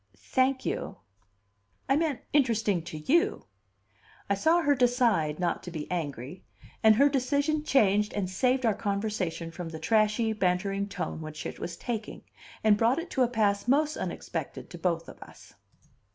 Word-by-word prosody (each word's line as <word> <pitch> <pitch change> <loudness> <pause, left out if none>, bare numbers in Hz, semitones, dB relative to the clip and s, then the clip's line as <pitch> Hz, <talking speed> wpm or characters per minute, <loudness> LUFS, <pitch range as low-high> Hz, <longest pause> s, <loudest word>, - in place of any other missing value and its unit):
"Thank 260 - 0
you." - - -3 0.9
"I 270 - +3
meant, 305 -3 0
interesting 225 - +2
to 155 - -6
you." 340 - +1 0.9
I - - +6
saw 325 - +3
her 290 -2 +4
decide 240 - +2
not 175 -1 -1
to - - -8
be 160 -3 -5
angry; 150 -2 -4 0.4
and 220 -1 +6
her 280 +6 +5
decision 285 +3 0
changed 210 -8 +3
and 200 -3 -1
saved 250 +7 +1
our 220 - +3
conversation 200 -5 -2
from 170 0 -6
the 160 - -7
trashy, 215 +6 +2
bantering 195 +1 0
tone 160 - -4
which 155 -1 -7
it - - -6
was 170 0 -5
taking, 225 -3 -5 0.4
and 215 -1 +5
brought 235 +5 +3
it 335 +1 -5
to 265 - 0
a 250 - +5
pass 210 -3 0
most 300 +4 +2
unexpected - - -5
to - - -9
both - - -1
of - - -12
us. - - -14
215 Hz, 165 wpm, -28 LUFS, 180-260 Hz, 0.9 s, I